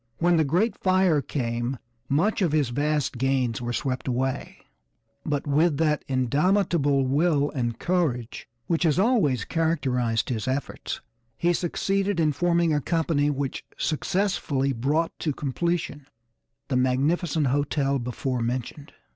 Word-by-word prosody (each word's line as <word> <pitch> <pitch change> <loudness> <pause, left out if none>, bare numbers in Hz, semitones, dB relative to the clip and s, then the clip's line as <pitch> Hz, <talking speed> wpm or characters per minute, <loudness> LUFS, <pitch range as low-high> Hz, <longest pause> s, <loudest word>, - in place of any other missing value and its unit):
When 175 0 +3
the 160 - +4
great 180 - +1
fire 185 -5 +3
came 120 -2 -2 0.3
much 175 +11 +1
of 170 -5 +1
his 145 -5 +2
vast 145 0 -1
gains 130 -3 0
were 120 0 -3
swept 130 +1 -2
away, 130 +1 -2 0.6
but 145 -2 -2
with 150 +1 +2
that 150 -1 +1
indomitable 145 - +2
will 145 +1 +2
and 120 -5 -2
courage 150 -10 -1 0.2
which 165 -2 0
has 160 -4 +2
always 185 - +2
characterized 130 -8 0
his 115 -3 -2
efforts, 135 +2 -3 0.4
he 175 +1 +2
succeeded 195 +2 0
in 155 -2 +3
forming 170 +2 +2
a 145 - +1
company 160 -2 +1
which 140 -2 -3
successfully 155 -5 0
brought 145 +7 0
to 150 - -1
completion 150 0 -2 0.6
the 135 - -1
magnificent 145 +5 +1
hotel 140 0 +1
before 125 +1 -3
mentioned. 125 +4 -4
145 Hz, 130 wpm, -25 LUFS, 130-170 Hz, 0.6 s, the